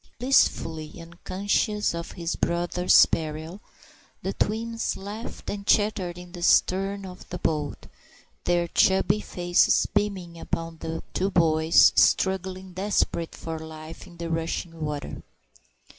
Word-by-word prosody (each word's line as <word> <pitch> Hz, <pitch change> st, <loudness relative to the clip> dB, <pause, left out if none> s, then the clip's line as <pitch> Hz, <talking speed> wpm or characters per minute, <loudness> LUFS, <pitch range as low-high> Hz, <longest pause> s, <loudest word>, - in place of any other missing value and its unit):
Blissfully 165 Hz, -, +1 dB
unconscious 195 Hz, +5 st, -1 dB
of 170 Hz, 0 st, -6 dB
their 170 Hz, -, -8 dB
brothers' 175 Hz, +1 st, +4 dB
peril, 160 Hz, +4 st, -4 dB, 0.6 s
the -, -, -2 dB
twins 230 Hz, +2 st, -2 dB
laughed 205 Hz, +4 st, -8 dB
and 200 Hz, -1 st, -5 dB
chattered 195 Hz, -4 st, +2 dB
in 180 Hz, 0 st, -11 dB
the 175 Hz, -1 st, -9 dB
stern 195 Hz, +3 st, +2 dB
of 180 Hz, -1 st, -11 dB
the 180 Hz, -, -4 dB
boat, 150 Hz, -4 st, -2 dB, 0.6 s
their 175 Hz, -1 st, +2 dB
chubby 190 Hz, +3 st, +3 dB
faces 175 Hz, -3 st, +2 dB
beaming 190 Hz, -5 st, -1 dB
upon 165 Hz, -1 st, -4 dB
the 165 Hz, 0 st, -5 dB
two 190 Hz, +2 st, 0 dB
boys 160 Hz, -3 st, +5 dB
struggling 190 Hz, 0 st, +1 dB
desperately 185 Hz, -3 st, -1 dB
for 165 Hz, -1 st, -5 dB
life 160 Hz, 0 st, -10 dB
in 175 Hz, -, -15 dB
the 170 Hz, 0 st, -5 dB
rushing 165 Hz, 0 st, -3 dB
water. 150 Hz, -2 st, -4 dB
175 Hz, 125 wpm, -26 LUFS, 165-195 Hz, 0.6 s, boys